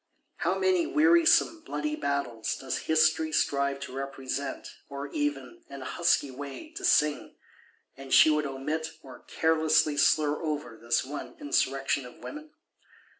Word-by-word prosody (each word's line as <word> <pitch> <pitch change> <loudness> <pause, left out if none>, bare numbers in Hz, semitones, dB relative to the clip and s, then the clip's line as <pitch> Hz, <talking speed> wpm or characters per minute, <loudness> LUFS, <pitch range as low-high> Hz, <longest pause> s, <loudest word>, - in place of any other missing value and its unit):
How - - 0
many 370 -3 +2
wearisome 330 0 +4
bloody 305 -1 -3
Battles 140 - -2
does 130 -1 -3
History 160 0 +3
strive 140 -2 0
to 140 - -7
represent; 135 0 -5 0.2
or 140 0 -6
even, 145 -3 -3
in 140 -1 -8
a - - -9
husky 170 -3 +1
way, 140 - -8
to 380 +3 -9
sing:—and 150 - -2
she 155 - +7
would 150 -1 +1
omit 150 +4 -4
or 130 -2 -12
carelessly 160 -2 +1
slur 150 +1 +3
over 150 -7 -4
this 115 +2 -1
one 145 - -7
Insurrection 135 - 0
of 125 - -14
Women? 300 +1 -9
145 Hz, 135 wpm, -28 LUFS, 135-160 Hz, 0.2 s, she